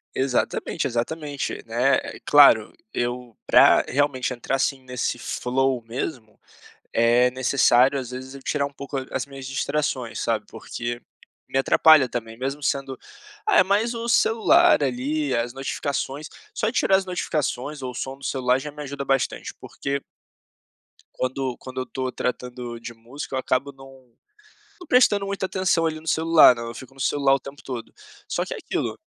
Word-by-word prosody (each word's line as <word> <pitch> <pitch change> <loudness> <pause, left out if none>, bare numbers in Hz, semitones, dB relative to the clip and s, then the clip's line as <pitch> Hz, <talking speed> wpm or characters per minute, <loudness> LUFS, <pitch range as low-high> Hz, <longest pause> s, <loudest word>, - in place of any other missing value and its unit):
Exatamente, 130 -2 -1
exatamente, 145 +4 -3
né, 125 +4 +2
eh, - - -8
claro 140 -7 +6 0.2
eu 120 -1 -3
pra - - +6
realmente 130 -2 0
entrar, 125 +2 -2
assim, 135 0 0
nesse 125 -1 -2
flow 130 +1 -1
mesmo, 115 -2 -5 0.5
é 120 +2 +4
necessário 130 +1 +3
às 125 -2 -5
vezes 130 +1 -8
eu 135 - -10
tirar 145 -2 -1
um 140 - -9
pouco 140 0 -5
as - - -3
minhas 135 -1 -9
distrações, 135 -3 -2
sabe, 110 -3 -1
porque 120 +1 -5 0.5
me 135 - 0
atrapalha 145 0 +6
também 115 -1 -5
mesmo 135 +3 -4
sendo 135 -2 -2 0.5
é 410 - +6
mais 210 +5 +1
o 230 0 -4
celular 235 - +4
ali, 140 +2 -1
as 120 +1 -1
notificações, 140 +2 -3 0.3
só 220 - 0
de - - -1
tirar 190 - +4
as 190 - -1
notificações 150 -6 -3
ou 130 - -3
o - - -11
som 135 0 -5
do 140 - -14
celular 125 -1 +1
já 150 +2 -6
me 150 +1 -9
ajuda 140 0 -5
bastante, 135 -1 -1
porque 140 0 -4 1.1
quando 130 -1 -2
quando 130 0 -8
eu - - -2
estou 130 0 -4
tratando 125 -1 -4
de 120 0 -8
música 125 +4 -8
eu - - 0
acabo 130 +2 -1
não 135 -3 -16 0.7
não 360 - -12
prestando 210 -6 +4
muita 195 -1 -2
atenção 185 -3 +1
ali 155 -1 -2
no 160 - -16
celular, 160 -6 +6
né, 115 - -6
eu 115 0 -6
fico 130 +1 -11
no - - -17
celular 135 0 +2
o - - -3
tempo 140 +1 -11
todo. 125 -4 -7 0.3
Só - - -1
que - - -5
é - - -7
aquilo - - -3
135 Hz, 170 wpm, -24 LUFS, 125-145 Hz, 1.1 s, claro